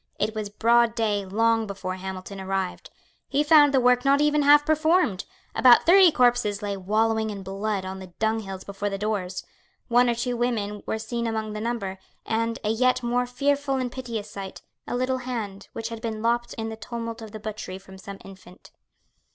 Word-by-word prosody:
It 215 Hz, +1 st, 0 dB
was 215 Hz, -2 st, -4 dB
broad 235 Hz, +2 st, +3 dB
day 210 Hz, -3 st, 0 dB
long 225 Hz, +2 st, +2 dB
before 195 Hz, -2 st, -5 dB
Hamilton 190 Hz, +1 st, -7 dB
arrived. 190 Hz, -1 st, -3 dB, 0.4 s
He 285 Hz, +2 st, +1 dB
found 295 Hz, -2 st, +6 dB
the 270 Hz, -, +3 dB
work 250 Hz, 0 st, +3 dB
not 275 Hz, +1 st, +4 dB
even 300 Hz, 0 st, +3 dB
half 290 Hz, +1 st, +6 dB
performed. 315 Hz, -, +2 dB, 0.3 s
About 245 Hz, -2 st, +6 dB
thirty 365 Hz, 0 st, +7 dB
corpses 240 Hz, -6 st, +2 dB
lay 200 Hz, -1 st, -2 dB
wallowing 220 Hz, +3 st, 0 dB
in 200 Hz, -2 st, -6 dB
blood 195 Hz, +1 st, -3 dB
on 190 Hz, 0 st, -6 dB
the 190 Hz, -, -9 dB
dunghills 220 Hz, -4 st, -2 dB
before 200 Hz, +1 st, -4 dB
the 195 Hz, -, -3 dB
doors. 195 Hz, -3 st, -3 dB, 0.4 s
One 245 Hz, +1 st, +4 dB
or 235 Hz, -, +1 dB
two 245 Hz, +1 st, -2 dB
women 220 Hz, -4 st, -2 dB
were -, -, -1 dB
seen 235 Hz, +1 st, -3 dB
among 220 Hz, -1 st, -3 dB
the 210 Hz, -, -5 dB
number, 210 Hz, -5 st, -3 dB, 0.3 s
and, 230 Hz, +1 st, -1 dB
a 210 Hz, -, 0 dB
yet 255 Hz, +2 st, +2 dB
more 245 Hz, +1 st, 0 dB
fearful 280 Hz, +2 st, 0 dB
and 255 Hz, -2 st, -2 dB
piteous 235 Hz, -5 st, -5 dB
sight, 195 Hz, -2 st, -8 dB, 0.2 s
a -, -, -3 dB
little 255 Hz, +1 st, 0 dB
hand, 220 Hz, -6 st, -5 dB
which 225 Hz, 0 st, -4 dB
had 230 Hz, -1 st, -7 dB
been 220 Hz, -1 st, -4 dB
lopped 240 Hz, +1 st, 0 dB
in 225 Hz, 0 st, -4 dB
the 220 Hz, -, -6 dB
tumult 230 Hz, 0 st, -6 dB
of 220 Hz, -1 st, -9 dB
the 215 Hz, -, -8 dB
butchery 210 Hz, -3 st, -6 dB
from 190 Hz, 0 st, -14 dB
some 200 Hz, +1 st, -9 dB
infant. 190 Hz, -1 st, -14 dB
225 Hz, 190 wpm, -25 LUFS, 200-245 Hz, 0.4 s, thirty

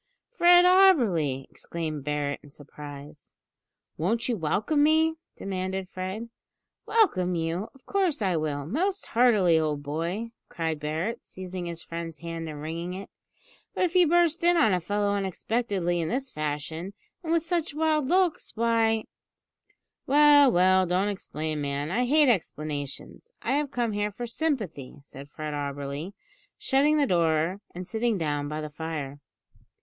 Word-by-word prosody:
"Fred 350 Hz, -2 st, +7 dB
Auberly!" 230 Hz, -, +4 dB
exclaimed 155 Hz, -4 st, -5 dB
Barret 145 Hz, -1 st, -2 dB
in 145 Hz, -, -15 dB
surprise. 145 Hz, 0 st, -11 dB, 0.6 s
"Won't 220 Hz, +8 st, 0 dB
you 245 Hz, -, 0 dB
welcome 215 Hz, -, 0 dB
me?" 320 Hz, +2 st, +3 dB, 0.2 s
demanded 190 Hz, -1 st, -4 dB
Fred. 190 Hz, +6 st, -5 dB, 0.6 s
"Welcome 185 Hz, -, +2 dB
you? 165 Hz, +5 st, -2 dB
Of 265 Hz, -, -21 dB
course 375 Hz, -7 st, 0 dB
I 190 Hz, -4 st, +1 dB
will, 150 Hz, -3 st, -2 dB
most 365 Hz, -, -1 dB
heartily, 210 Hz, -9 st, +4 dB
old 150 Hz, -2 st, -1 dB
boy!" 170 Hz, +10 st, -3 dB, 0.2 s
cried 160 Hz, -3 st, -2 dB
Barret, 160 Hz, +10 st, -3 dB
seizing 185 Hz, -1 st, -7 dB
his 170 Hz, -1 st, -5 dB
friend's 165 Hz, -1 st, -6 dB
hand 165 Hz, -1 st, -6 dB
and 150 Hz, -1 st, -7 dB
wringing 170 Hz, +3 st, -4 dB
it; 195 Hz, +1 st, -8 dB, 0.6 s
"but -, -, +1 dB
if 355 Hz, -2 st, +1 dB
you 360 Hz, -2 st, +5 dB
burst 340 Hz, 0 st, +3 dB
in 350 Hz, 0 st, +4 dB
on 255 Hz, -, +4 dB
a 180 Hz, -, +2 dB
fellow 205 Hz, +4 st, 0 dB
unexpectedly 195 Hz, -2 st, -1 dB
in 160 Hz, -, -2 dB
this 265 Hz, +2 st, -2 dB
fashion, 155 Hz, +5 st, -4 dB, 0.3 s
and 325 Hz, -, -3 dB
with 335 Hz, -1 st, +2 dB
such 335 Hz, -3 st, -1 dB
wild 310 Hz, -2 st, +1 dB
looks, 365 Hz, -2 st, +1 dB
why 225 Hz, -1 st, +2 dB, 0.5 s
" -, -, -44 dB
"Well, 290 Hz, -1 st, +7 dB
well, 185 Hz, 0 st, +4 dB
don't 185 Hz, +4 st, +1 dB
explain, 155 Hz, -6 st, -4 dB
man; 145 Hz, +2 st, -2 dB
I 245 Hz, +5 st, +1 dB
hate 300 Hz, +2 st, +5 dB
explanations. 155 Hz, -, -3 dB
I -, -, -1 dB
have 290 Hz, +1 st, +1 dB
come 240 Hz, -4 st, -1 dB
here 205 Hz, 0 st, -1 dB
for 240 Hz, +4 st, -6 dB
sympathy," 230 Hz, -, -3 dB
said 140 Hz, 0 st, -12 dB
Fred 155 Hz, 0 st, -6 dB
Auberly, 145 Hz, +4 st, -4 dB, 0.4 s
shutting 290 Hz, +3 st, +2 dB
the 290 Hz, -, +3 dB
door 170 Hz, -, +1 dB
and 180 Hz, 0 st, -6 dB
sitting 225 Hz, +2 st, 0 dB
down 145 Hz, -3 st, -1 dB
by 150 Hz, +1 st, -4 dB
the 150 Hz, 0 st, -6 dB
fire. 150 Hz, -3 st, -5 dB
185 Hz, 155 wpm, -27 LUFS, 155-260 Hz, 0.6 s, Fred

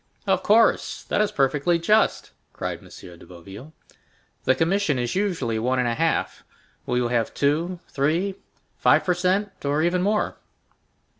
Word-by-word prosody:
"Of 190 Hz, -2 st, +1 dB
course, 220 Hz, +4 st, +2 dB
that -, -, 0 dB
is 210 Hz, -, +1 dB
perfectly 145 Hz, +5 st, +1 dB
just," 210 Hz, +6 st, +1 dB, 0.2 s
cried -, -, -4 dB
M. -, -, -17 dB
de 85 Hz, -1 st, -13 dB
Boville. 95 Hz, -, -12 dB, 0.7 s
"The 130 Hz, -, +4 dB
commission 165 Hz, -3 st, +1 dB
is 120 Hz, -1 st, -2 dB
usually 165 Hz, -, -1 dB
one 125 Hz, +3 st, 0 dB
and 125 Hz, -1 st, +1 dB
a 120 Hz, -, 0 dB
half; 165 Hz, +6 st, -1 dB, 0.4 s
will 125 Hz, -, 0 dB
you 120 Hz, -1 st, 0 dB
have 120 Hz, -2 st, -1 dB
two—three—five 170 Hz, +3 st, -1 dB
per 180 Hz, -, +1 dB
cent, 190 Hz, +3 st, -1 dB
or 145 Hz, +2 st, 0 dB
even 175 Hz, +1 st, +1 dB
more? 210 Hz, +3 st, 0 dB
165 Hz, 145 wpm, -23 LUFS, 125-190 Hz, 0.7 s, The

